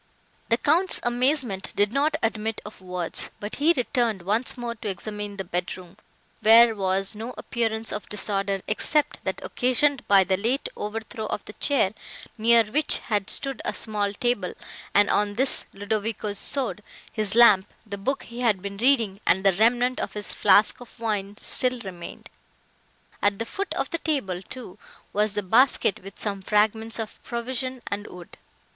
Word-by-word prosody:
The 230 - +4
Count's 335 +8 +3
amazement 245 -4 +1
did 205 +2 +2
not 300 +3 +1
admit 220 0 -1
of 210 -2 -11
words; 180 -2 -2
but 205 +1 -6
he 300 +4 +4
returned 235 -6 0
once 215 +8 0
more 240 -1 -4
to 225 -1 -8
examine 205 +1 -5
the 195 - -3
bedroom, 180 0 -5 0.5
where 230 +1 +7
was 195 +1 -1
no 225 +4 -6
appearance 225 -1 -2
of 210 - -6
disorder, 195 -2 -1
except 295 +7 0
that - - -2
occasioned 255 +2 +1
by 195 -1 +6
the 190 +1 0
late 235 +7 -1
overthrow 220 +1 -5
of 205 - -4
the 210 - -10
chair, 240 -8 +1 0.4
near 230 +1 +5
which 285 +9 +1
had 205 -3 -2
stood 270 -3 0
a - - -2
small 205 -2 0
table, 210 -5 -1 0.4
and 205 0 +5
on 205 0 +1
this 265 +4 +4
Ludovico's 205 0 -2
sword, 255 -6 +1 0.3
his 215 -1 -1
lamp, 210 -5 +6
the 205 -2 -5
book 270 +7 -2
he 235 +1 -10
had 225 -6 +2
been 200 +1 -7
reading, 225 -5 +2
and 190 - +3
the 195 - +5
remnant 240 +5 +2
of - - -4
his 210 -1 -4
flask 210 +4 +4
of 245 -1 -14
wine 205 -3 -2
still 250 +1 +1
remained. 180 -4 -9 0.9
At 205 -1 +2
the 230 - -3
foot 400 +11 -5
of - - -2
the 335 - -2
table, 235 - -2
too, 210 -3 -10 0.3
was 210 0 +1
the 205 0 -2
basket 225 -1 +3
with 195 +1 -10
some 200 -2 -3
fragments 220 +3 +1
of 220 -2 -6
provision 255 +1 -5
and 205 +1 -4
wood. 180 -1 -12
215 Hz, 165 wpm, -25 LUFS, 200-240 Hz, 0.9 s, where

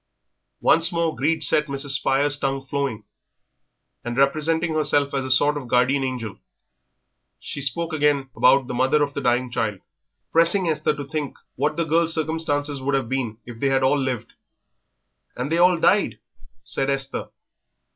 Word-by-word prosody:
Once 165 +2 +4
more 170 -2 -1
greed 155 +6 0
set 150 +3 +3
Mrs. 140 0 -2
Spires' 140 +1 +2
tongue 135 -1 -2
flowing, 135 -6 -3 1.0
and, 120 +1 -5
representing 160 +4 +1
herself 145 -2 +2
as 135 -1 -1
a 130 - -5
sort 145 +3 +4
of 135 -4 -7
guardian 125 +3 +2
angel, 125 -6 -5 1.0
she 140 - -6
spoke 165 +4 -1
again 145 -3 +1
about 130 +1 +4
the 125 - -6
mother 130 +4 +2
of 145 0 -3
the 140 - -4
dying 125 0 0
child, 105 -5 -2 0.5
pressing 170 +3 +3
Esther 155 -1 0
to 145 -1 -6
think 150 0 -4 0.2
what 150 +4 -1
the 170 - 0
girl's 165 +1 +2
circumstances 150 -3 -2
would 135 +1 0
have 135 -4 -2
been 125 -5 -2
if 120 -2 -10
they 140 - +1
had 135 0 +1
all 130 +2 +3
lived. 130 -4 -4 1.0
"And 130 +4 -4
they 165 - +1
all 180 0 +5
died?" - - +2 0.5
said 135 - -2
Esther. 135 0 -3
140 Hz, 165 wpm, -23 LUFS, 130-155 Hz, 1.0 s, all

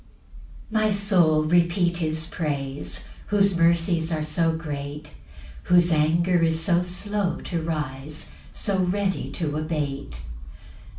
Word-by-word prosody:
1 215 -1 +2
My - - +3
soul, 185 -7 +3
repeat 175 +2 +2
his 160 -1 -1
praise 145 -4 -4 0.2
Whose 200 -2 +3
mercies 170 0 +2
are 155 -1 -1
so 165 +2 +1
great, 150 -2 -6 0.5
Whose 175 -1 +4
anger 165 +3 +3
is 160 -1 +2
so 175 +1 +2
slow 190 +2 -2
to 170 -2 -3
rise, 150 -2 -5 0.2
So 200 -3 -1
ready 190 +1 -1
to 150 -3 -2
abate. 145 - -3
165 Hz, 120 wpm, -24 LUFS, 155-180 Hz, 0.5 s, Whose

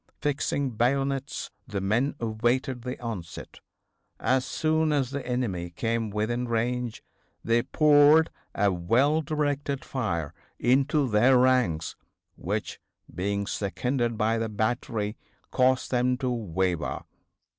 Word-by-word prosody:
Fixing 140 -2 -1
bayonets 135 +4 -1 0.2
the 105 -4 -3
men 115 +9 0
awaited 120 +3 0
the 125 +2 -5
onset. 105 -9 -7 0.6
As 130 0 +2
soon 160 +1 +1
as 135 -4 0
the 140 -1 -4
enemy 105 -9 -2
came 115 +5 -2
within 115 +4 -1
range 120 0 -2 0.4
they 115 +1 +3
poured 150 +3 +5 0.2
a 100 0 +3
well 125 - +2
directed 145 -2 -2
fire 85 - -2 0.2
into 135 +3 +2
their 120 +4 +5
ranks 125 -11 +2 0.4
which, - - -4 0.3
being 100 +2 -1
seconded 115 - -1
by 110 +2 +1
the 115 0 -2
battery, 110 0 -2 0.3
caused 130 0 +2
them 125 0 +2
to 130 -1 -1
waver. 95 -6 -2
120 Hz, 115 wpm, -27 LUFS, 105-135 Hz, 0.6 s, poured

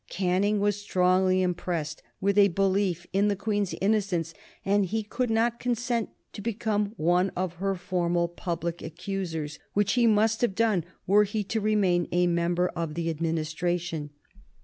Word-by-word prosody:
Canning 195 +3 +1
was 205 0 0
strongly 185 -1 +2
impressed 170 -3 -2 0.2
with 200 +1 +1
a 205 -1 +7
belief 190 -2 0
in 200 +2 +3
the 205 - +1
Queen's 205 -1 -1
innocence 190 -5 0 0.3
and 200 0 +3
he 220 +4 -1
could 245 +4 -2
not 230 +1 +1
consent 240 -2 -1 0.2
to - - -7
become 210 -1 -1
one 175 +4 +2
of 180 -1 -3
her 195 +1 -1
formal 175 -2 0
public 170 -1 -4
accusers, 165 -3 -4
which 205 0 +2
he 240 -2 +4
must 220 +1 +3
have 235 -6 +1
done 210 -7 +2 0.2
were 205 +3 +5
he 210 +1 -2
to 220 +3 -2
remain 195 -5 +2
a 180 +1 +3
member 175 +1 +1
of 165 -3 -4
the 165 -1 -1
administration. 165 0 -2
190 Hz, 155 wpm, -27 LUFS, 175-205 Hz, 0.3 s, a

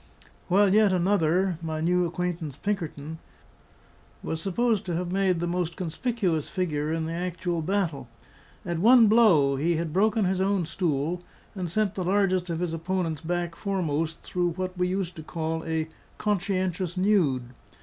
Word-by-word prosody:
While 195 +1 +4
yet 210 -1 +5
another 180 -1 +2
(my 160 -1 -3
new 175 +2 +2
acquaintance, 170 -4 -3
Pinkerton) 160 -6 -4 1.0
was 160 - -3
supposed 215 +3 +1
to 175 - -1
have 175 +1 -2
made 190 -2 +2
the 175 - -1
most 175 -1 -2
conspicuous 180 - -1
figure 155 -6 -1
in 160 0 -1
the 165 - -3
actual 175 0 -2
battle. 160 -7 -1 0.6
At 170 -2 -2
one 235 +4 +7
blow, 190 -12 +5
he 165 +5 +1
had 160 -1 -3
broken 210 +2 +2
his 185 0 0
own 195 -2 +1
stool, 165 0 -1 0.3
and 185 -3 -4
sent 205 +2 0
the 185 - -3
largest 185 -1 +1
of 165 0 -2
his 175 -2 -1
opponents 165 -2 -2
back 175 0 -2
foremost 165 -5 -2
through 175 -1 -1
what 185 +1 -4
we 180 0 0
used 185 -1 -2
to - - -6
call 160 0 -3
a 160 -1 -1 0.3
"conscientious 185 -3 -1
nude." 160 -11 +2
175 Hz, 160 wpm, -26 LUFS, 160-190 Hz, 1.0 s, one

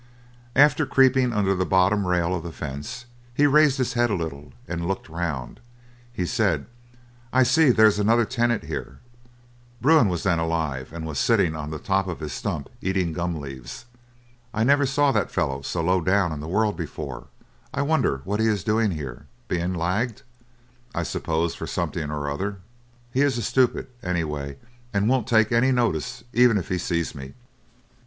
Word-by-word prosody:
After 145 +1 +5
creeping 130 -2 +4
under 100 -3 +1
the 95 -1 0
bottom 95 +2 +2
rail 90 0 +1
of 90 - -2
the 85 +1 -7
fence, 80 - -6 0.3
he 145 - +4
raised 145 -1 +5
his 130 -2 -1
head 120 0 +2
a 105 - +1
little, 75 -5 -5 0.2
and 85 -1 -3
looked 95 0 -3
round. 80 -7 -4 0.5
He 95 -7 -2
said, 75 - 0 0.7
"I 130 0 +5
see 145 +4 +4
there's 110 -3 +5
another 115 +3 +3
tenant 120 -1 0
here" 70 - -6 0.8
Bruin 145 -2 +5
was 85 -2 -2
then 85 -4 +2
alive 80 -6 -2
and 80 0 -6
was 80 - -3
sitting 110 -10 +2
on 75 -1 -5
the 80 - -4
top 95 +4 0
of 90 - -4
his 75 -3 -5
stump 70 +2 -3
eating 95 -3 0
gum 85 -1 -2
leaves 70 - -8 0.7
"I 110 - +2
never 140 +2 +4
saw 140 +1 +3
that 105 -7 0
fellow 70 0 -1
so 80 +4 -3
low 90 +2 +2
down 95 0 +2
in 75 - -4
the 75 - -6
world 105 +4 +1
before; 85 -4 -6 0.4
I 140 - -1
wonder 140 - +1
what 100 +6 -2
he 110 - +3
is 105 -4 0
doing 110 0 +2
here; 70 -8 -6 0.2
been 90 +1 -1
lagged, 105 +7 -1 0.7
I - - 0
suppose 80 +1 -1
for - - -6
something 75 -3 -3
or 75 -1 -3
other. 95 +8 -3 0.6
He 135 - +2
is 140 -3 +2
a 120 - -2
stupid, 130 +3 +2 0.2
anyway, 75 -6 -3 0.4
and 100 +1 +2
won't 125 -2 +1
take 110 -2 +3
any 120 +3 +3
notice 120 - -1
even 120 -2 +5
if 95 - -4
he 90 - 0
sees 85 -1 -1
me." 70 -2 -9
95 Hz, 180 wpm, -24 LUFS, 80-120 Hz, 0.8 s, After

